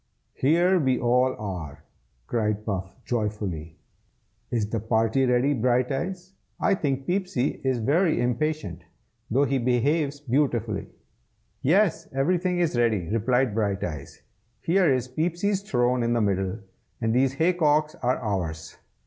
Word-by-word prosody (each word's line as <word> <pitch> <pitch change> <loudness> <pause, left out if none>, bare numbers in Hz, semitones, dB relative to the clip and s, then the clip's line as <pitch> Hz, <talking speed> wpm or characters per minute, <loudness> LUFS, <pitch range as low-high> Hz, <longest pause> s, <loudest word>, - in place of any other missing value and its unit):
"Here 175 +6 +3
we 130 -4 +2
all 125 +2 +2
are!" 80 -8 -6 0.4
cried 105 - -1
Puff, 95 -3 -4
joyfully. 105 -9 -3 0.7
"Is 110 -3 0
the 115 +1 -2
party 115 +4 +1
ready, 125 +3 +3
Brighteyes? 135 - -1 0.3
I - - +3
think 135 -7 -1
Peepsy 180 -8 -1
is 130 -2 +1
very 155 - +2
impatient, 125 - -1 0.5
though 135 +5 +3
he 135 -1 0
behaves 140 +4 +1
beautifully." 120 -6 0 0.7
"Yes, 180 +5 +2
everything 180 +6 +1
is 170 -6 +1
ready!" 110 -8 +1
replied 120 +2 +1
Brighteyes. 95 -9 -3 0.4
"Here 175 -2 +3
is 130 -1 0
Peepsy's 175 +8 -1
throne 125 -8 +1
in 120 0 +1
the 120 - +1
middle, 95 0 -1 0.4
and 115 -1 0
these 130 +1 +2
hay 165 +6 +2
cocks 155 -2 +2
are 125 +1 +1
ours. 85 -8 -4
125 Hz, 130 wpm, -25 LUFS, 110-150 Hz, 0.7 s, Here